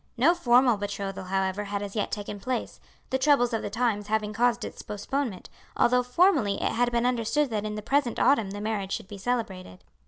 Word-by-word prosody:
No 295 +9 +5
formal 245 -7 +4
betrothal, 200 -2 -4
however, 190 +2 -1
had 200 0 -3
as 200 +1 -7
yet 210 - -1
taken 205 0 -5
place, 250 +3 -3 0.3
the 265 - +1
troubles 260 -4 +3
of 225 - 0
the - - -4
times 225 -4 -1
having 215 0 -1
caused 240 0 +1
its - - -8
postponement, 210 +1 -4 0.3
although 250 +1 +4
formerly 250 - +3
it - - 0
had 245 +1 +1
been 235 0 +1
understood 250 +3 +1
that 215 -1 -2
in 210 0 -3
the 210 - -6
present 270 -1 +1
autumn 245 -6 +3
the 205 +1 -6
marriage 205 -3 -2
should - - -4
be 200 0 -9
celebrated. 190 - -3
220 Hz, 200 wpm, -27 LUFS, 205-250 Hz, 0.3 s, No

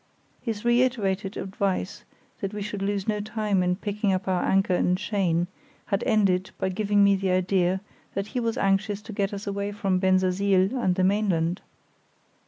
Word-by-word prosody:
His 225 -2 -4
reiterated 225 -6 +1
advice 190 - -2 0.3
that 195 +1 -4
we 205 - -3
should 205 -1 -5
lose 200 -1 -1
no 210 -1 0
time 210 -2 0
in 180 0 +1
picking 205 +1 -1
up 190 0 -1
our 185 -1 +1
anchor 195 -1 +2
and 180 0 +2
chain 185 -4 0 0.4
had 200 - -1
ended 190 -3 +2
by 190 - -1
giving 205 +1 +2
me 200 0 +5
the 190 0 -1
idea 185 0 +1 0.3
that 195 - -1
he 250 - -2
was 230 -1 -1
anxious 195 +1 +1
to 220 0 -8
get 200 0 -1
us 200 0 -6
away 200 0 -2
from 195 -2 0
Bensersiel 190 +2 +2
and 190 -8 +1
the 185 - +1
mainland. 185 -3 +1
195 Hz, 175 wpm, -26 LUFS, 185-210 Hz, 0.4 s, me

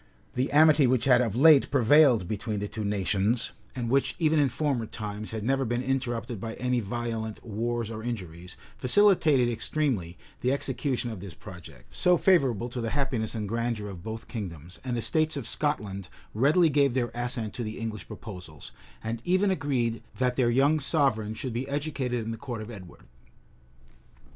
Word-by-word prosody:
{1290.} 125 - 0
The 145 - 0
amity 155 -3 +6
which 125 0 +2
had 125 -2 +5
of 115 -4 -1
late 145 +2 +6
prevailed 130 - +5
between 110 +1 -3
the 105 - -3
two 110 +1 -5
nations, 105 +3 0 0.2
and 120 -2 -3
which, 135 +3 +1
even 160 -2 +2
in 140 -2 +3
former 130 -3 -1
times, 105 -1 -6
had 110 -2 -5
never 135 +3 +1
been 120 0 -1
interrupted 120 -4 -2
by 115 0 -5
any 125 0 0
violent 115 0 -4
wars 115 +1 -2
or 110 -1 -6
injuries, 90 -7 -6 0.2
facilitated 155 -4 +4
extremely 115 - -1 0.2
the 125 - +1
execution 135 -2 -1
of 110 - -7
this 95 -1 -9
project, 85 - -13
so 180 -1 +4
favorable 135 - +3
to 125 0 -5
the 115 - -2
happiness 125 -5 -1
and 105 -2 -3
grandeur 115 -1 -2
of 90 -3 -8
both 110 +3 -6
kingdoms; 90 - -7
and 125 -2 -2
the 115 - -2
states 155 +6 +1
of 135 - -5
Scotland 100 -11 -2 0.2
readily 150 - +4
gave 140 -3 +3
their 120 -2 0
assent 120 -3 -3
to - - -5
the 110 -1 -4
English 110 -2 -5
proposals, 90 -8 -9 0.3
and 115 +1 -3
even 185 +3 +2
agreed 130 -9 -1 0.2
that 125 -1 +1
their 125 -2 +2
young 140 +6 +3
sovereign 135 -7 +1
should 125 +1 -5
be 130 +4 -3
educated 140 -5 -2
in 115 - -3
the 115 - -5
court 115 -2 -6
of 110 - -9
Edward. 95 -6 -11
120 Hz, 180 wpm, -27 LUFS, 110-135 Hz, 0.3 s, amity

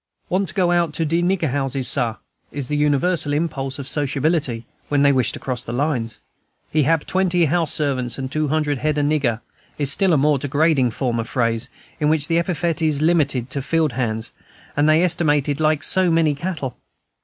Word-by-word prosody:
"Want 190 +2 0
to 170 - -3
go 180 -2 +2
out 170 -3 +1
to 165 - 0
de 165 +3 +1
nigger 175 -5 0
houses, 135 -2 0
Sah," 120 -4 +2 0.4
is 140 -3 -5
the 150 - 0
universal 150 +2 +1
impulse 145 -4 -2
of 140 -2 -6
sociability, 145 -4 0 0.2
when 145 -1 +2
they 140 - +5
wish 130 -4 +1
to - - -5
cross 125 -2 -4
the - - -7
lines. 125 -4 -1 0.5
"He 155 - +2
hab 155 +2 +1
twenty 180 -2 +1
house 165 0 +1
servants, 130 -5 0
an' 130 -1 -4
two 155 +2 -1
hundred 150 -2 0
head 150 +1 -1
o' 145 - +1
nigger," 140 -6 0 0.4
is 145 -2 +1
a - - +1
still 180 +1 +3
more 145 0 +2
degrading 145 -1 +2
form 120 0 -2
of 115 - -4
phrase, 115 -2 0 0.3
in 150 -1 +2
which 155 -2 +2
the 165 0 +2
epithet 170 -1 -1
is 155 -2 +1
limited 140 -7 +1
to 140 - -1
the - - -5
field 160 0 +1
hands, 115 -2 -3 0.4
and 145 +1 +3
they 155 +3 +4
estimated 150 -4 +1
like 155 -1 +1
so 185 -1 +3
many 165 -2 +2
cattle. 145 -4 -5
145 Hz, 200 wpm, -21 LUFS, 135-160 Hz, 0.5 s, they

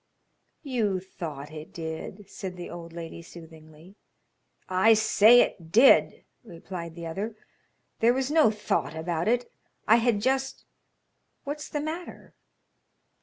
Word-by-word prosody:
"You 225 -9 -1
thought 155 -6 -8
it 155 0 -9
did," 165 +5 -7
said 190 -2 -7
the 175 - -7
old 170 -1 -9
lady 170 0 -8
soothingly. 160 +2 -15 0.7
"I 190 +5 +4
say 220 +2 +6
it 165 -3 -3
did," 245 +7 +5 0.2
replied 170 -4 -8
the 170 -1 -7
other. 200 +7 -4 0.6
"There 230 +1 +5
was 265 +2 -1
no 310 -5 +5
thought 210 -7 -2
about 165 +1 -2
it; 245 +1 0 0.4
I 225 - +7
had 235 -3 +1
just 265 +4 -1 0.8
What's 295 +1 -6
the 295 - -3
matter?" 325 +4 -7
190 Hz, 125 wpm, -27 LUFS, 165-240 Hz, 0.8 s, I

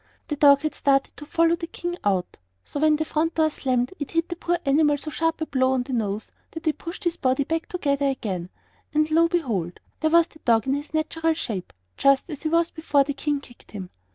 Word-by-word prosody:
The 300 - 0
dog 280 -1 +6
had 310 - -2
started 275 -1 +1
to 295 - -9
follow 335 +1 +3
the 335 -1 -6
King 350 +1 -4
out, 190 -3 0 0.3
so 290 - -5
when 310 0 +4
the 315 +1 -1
front 320 +2 0
door 315 -1 +3
slammed 255 0 -1
it 290 - -4
hit 330 +1 0
the 345 - -3
poor 345 0 0
animal 295 +1 +3
so 305 +2 -6
sharp 325 +1 -1
a - - +1
blow 260 -3 +1
on 255 -1 +1
the 260 - -6
nose 215 -2 -2 0.2
that 325 0 -9
it 310 - 0
pushed 345 +5 -7
his 345 -1 0
body 260 +1 +1
together 300 -3 -1
again; 190 -10 -3 0.5
and, 305 +1 +2
lo 325 +2 +5
and 335 - +4
behold! 225 - -1 0.2
there 315 - +2
was 335 +1 +6
the 315 - -19
dog 225 -5 +2
in 265 - +1
his 290 +2 -4
natural 325 +1 0
shape, 210 - -4 0.3
just 275 -1 +4
as 295 - -7
he 315 - -1
was 335 +1 +2
before 295 -3 +2
the 285 +1 -3
King 290 0 -1
kicked 240 -4 -17
him. 190 -3 -7
295 Hz, 235 wpm, -24 LUFS, 260-325 Hz, 0.5 s, dog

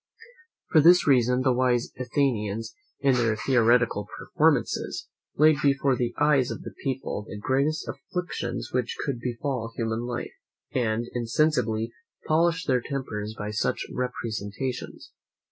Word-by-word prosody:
For 155 - +6
this 175 +4 +7
reason 125 -2 +3
the 130 -1 +3
wise 125 -1 +1
Athenians, 115 -5 -1 0.3
in 135 -1 +4
their 115 -3 +2
theatrical 115 -2 +2
performances, - - 0 0.3
laid 155 0 +6
before 140 -2 +3
the 120 -1 -2
eyes 145 -4 +3
of - - -6
the - - -8
people 130 -5 -3
the 105 - -6
greatest 140 +8 0
afflictions 130 -6 -4
which 125 -2 -1
could 135 -4 -2
befall 120 -1 -3
human 115 -1 -1
life, 120 -1 -4 0.4
and 115 -2 0
insensibly 115 -2 +1 0.3
polished 165 +2 +2
their 130 -3 +2
tempers 110 -6 -4
by 105 0 -4
such 105 - -1
representations. 120 -1 -4
125 Hz, 130 wpm, -26 LUFS, 115-140 Hz, 0.4 s, this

